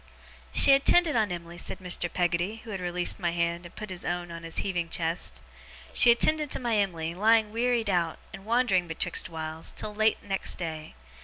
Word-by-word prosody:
'She 275 - +7
attended 310 +3 +4
on 215 -4 +1
Em'ly,' 170 0 -7
said - - -4
Mr. 180 -1 0
Peggotty, 180 +5 -1
who 225 - -9
had 195 - -4
released 175 +2 -1
my 175 -2 0
hand, 170 0 -2
and - - -20
put 215 -2 -7
his 180 - -3
own 175 0 -3
hand - - -9
on 165 0 -7
his 165 0 -7
heaving 175 -4 -2
chest; 165 +1 -1 0.5
'she 245 - +7
attended 300 +5 +3
to - - -2
my 235 -3 -1
Em'ly, 170 -5 -1
lying 215 +3 +3
wearied 235 0 0
out, 175 -4 0 0.2
and 195 - -9
wandering 220 -5 +1
betwixt 160 - -1
whiles, 160 -1 -7
till 210 - -5
late 215 +1 +1
next 195 -1 -3
day. 160 - -6
180 Hz, 200 wpm, -27 LUFS, 170-220 Hz, 0.5 s, She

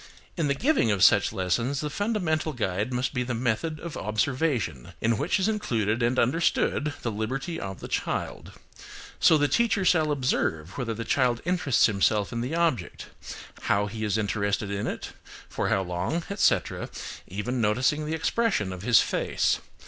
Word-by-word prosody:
In 165 -4 0
the 140 - +1
giving 255 - +2
of 100 -3 +2
such - - +5
lessons 115 +9 -1
the 150 0 -3
fundamental 175 -7 -1
guide 105 -1 -2
must 125 +2 -1
be 125 - -1
the 125 -1 -2
method 125 +7 -1
of 170 -1 -7
observation, 110 - -1
in 115 +1 +2
which 150 - 0
is 190 - +1
included 115 - 0
and 120 +2 +1
understood 150 +1 +1
the 115 - -1
liberty 130 +10 -3
of 95 -1 -6
the - - -6
child. - - -3 0.7
So 160 - +6
the 145 0 +2
teacher 225 0 +2
shall 160 -4 +3
observe 95 - -1
whether 115 -3 -3
the 115 +1 -5
child 125 0 +2
interests 180 -8 +3
himself 105 0 +1
in 115 - -2
the 130 +7 -2
object, 160 - -1 0.6
how 100 +1 +2
he 110 +2 -5
is 105 -1 0
interested 100 -1 -1
in 100 +1 -2
it, - - -5 0.4
for - - -2
how 95 - +2
long, 90 - -2
etc., 200 - +1 0.4
even 120 +6 -3
noticing 130 +8 +1
the 160 - -1
expression 160 - 0
of 90 - -8
his 115 +2 +5
face. - - 0
125 Hz, 170 wpm, -26 LUFS, 105-155 Hz, 0.7 s, So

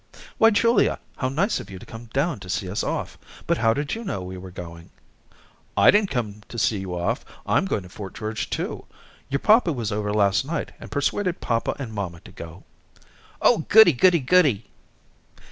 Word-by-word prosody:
"Why, 225 - +7
Julia, 230 0 +3 0.2
how 130 - -1
nice 185 - 0
of - - -9
you 95 - -8
to - - -12
come 115 +1 -10
down 140 +6 -1
to 90 - -11
see 95 +1 -2
us 95 +3 -2
off, - - -3 0.3
but - - +1
how 115 0 +4
did 145 +5 -2
you 230 - -4
know 100 - -4
we 90 +1 -7
were 95 0 -9
going?" 85 -2 -10 0.9
"I - - +7
didn't 205 -1 +2
come 105 - -3
to 120 - -8
see 110 -2 +1
you 90 -2 -5
off; 85 - -1 0.2
I'm - - +2
going 95 - -1
to 90 - -12
Fort 95 +1 -9
George, 110 0 -4
too. - - -4 0.4
Your 140 - +1
papa 215 - +4
was 120 -7 -3
over 105 0 -2
last 100 0 +2
night 150 +3 -4
and - - -10
persuaded 180 +5 -1
papa 115 -1 -1
and 125 -6 -6
mamma 95 -5 -4
to - - -14
go." 85 +2 -10 0.8
"Oh - - +5
goody, 215 -5 +8
goody, 170 +5 +4
goody." 130 - +3
115 Hz, 195 wpm, -24 LUFS, -, 0.9 s, goody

